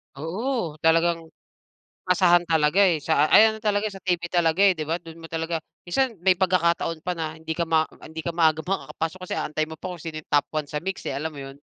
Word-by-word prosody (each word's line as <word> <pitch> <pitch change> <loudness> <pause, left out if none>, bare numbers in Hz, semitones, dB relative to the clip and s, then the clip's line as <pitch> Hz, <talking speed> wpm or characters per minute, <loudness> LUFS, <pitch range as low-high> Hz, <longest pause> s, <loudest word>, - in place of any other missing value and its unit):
Oo, 180 - -3
talagang 165 +1 +3 0.8
asahan 175 -1 +4
talaga, 160 +4 +3
eh, 170 -5 +3
sa 155 -2 +3
ay 220 - +8
ano 220 - -8
talaga, 210 0 +1
sa 195 -1 -11
television 175 -2 0
talaga, 170 0 +2
eh, 195 -2 +6
di 155 - -3
ba? 165 - 0
Dun 165 0 -12
mo 165 - -8
talaga 165 0 -2 0.3
minsan 250 +5 0
may 190 -1 +5
pagkakataon 170 -3 +1
pa 180 - -1
na 160 -1 -4
hindi 160 0 -4
ka 170 - 0
ma 160 -1 +3 0.2
hindi 160 +1 -8
ka 170 - -2
maaga 160 -2 +3
makakapasok 185 -2 -3
kasi - - -3
aantayin 155 +1 -2
mo - - -34
pa - - -6
kung 170 - -10
sino 160 -2 -5
yung - - -33
top 145 -1 +3
one 150 -1 -1
sa 150 - -3
MYX, 190 0 -4
eh, 135 - -3
alam 155 +3 -3
mo - - -8
yun? 135 +1 -11
165 Hz, 230 wpm, -24 LUFS, 160-185 Hz, 0.8 s, ay